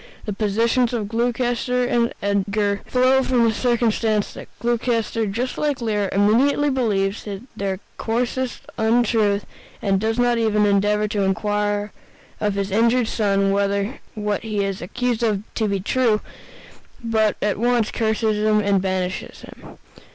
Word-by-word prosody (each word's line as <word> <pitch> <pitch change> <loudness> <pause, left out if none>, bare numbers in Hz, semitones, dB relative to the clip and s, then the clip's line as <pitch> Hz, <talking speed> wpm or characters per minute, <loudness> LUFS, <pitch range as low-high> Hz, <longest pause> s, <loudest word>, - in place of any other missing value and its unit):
The 210 - -3
positions 230 +4 +1
of 220 -4 -2
Gloucester 245 +2 0
and 235 -1 +1
Edgar 200 0 0
flow 260 +1 +3
from 250 -2 +2
the 225 -1 +3
circumstance 225 -3 +1
that - - -9
Gloucester, 230 -2 0
just 240 +6 -3
like 295 -2 0
Lear, 210 -4 -1
immediately 255 +9 +3
believes 205 -6 0
the 200 -2 -5 0.2
coarsest 245 +2 -2 0.2
untruth 220 -3 +2 0.3
and 195 -2 +1
does 220 +2 -1
not 245 -1 +2
even 210 -2 +2
endeavor 205 +1 +2
to 205 -1 -1
inquire 205 +1 0 0.5
of 205 -2 0
his 200 0 -2
injured 230 +3 +2
son 200 -2 +1
whether 200 +4 0 0.2
what 210 -1 -2
he 215 -2 -2
is 195 -1 -3
accused 245 +5 -2
of 210 -4 0
be 205 -3 0
true, 225 +1 +1 0.8
but 220 -2 +1
at 205 -1 -1
once 240 -2 +2
curses 220 -1 0
and 210 -2 +2
banishes 185 -1 -3
him. - - -13
215 Hz, 135 wpm, -22 LUFS, 200-240 Hz, 0.8 s, flow